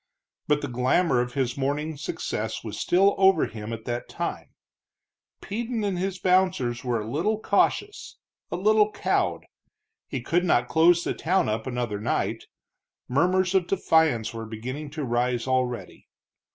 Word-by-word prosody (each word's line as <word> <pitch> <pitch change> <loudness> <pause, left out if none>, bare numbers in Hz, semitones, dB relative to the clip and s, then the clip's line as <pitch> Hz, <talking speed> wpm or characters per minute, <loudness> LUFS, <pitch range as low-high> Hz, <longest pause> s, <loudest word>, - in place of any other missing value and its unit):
But 150 0 +2
the - - -1
glamour 125 +3 +2
of 125 +1 -4
his 130 -3 0
morning's 145 +2 -2
success - - -3
was - - -6
still 195 +3 +3
over 190 -4 +5
him 110 0 -7
at 115 -1 -6
that 120 0 -4
time; - - -4 0.9
Peden 230 +2 -3
and 195 -3 -1
his 190 0 -2
bouncers 180 -11 +1
were 120 -3 0
a 105 - -5
little 170 - 0
cautious, 410 - 0 0.3
a - - -3
little 210 +3 +3
cowed. - - 0 0.6
He 135 - -3
could 170 +8 0
not 120 -9 +2
close 170 +3 +4
the - - -1
town 185 +3 +1
up 110 +2 -2
another 120 -5 -2
night; 105 - -2 0.6
murmurs 180 +7 +2
of 185 -2 +2
defiance 160 - +2
were 115 -1 -6
beginning 130 +7 -6
to 150 +1 -5
rise 120 0 0
already. 130 -2 -2
150 Hz, 150 wpm, -26 LUFS, 120-185 Hz, 0.9 s, over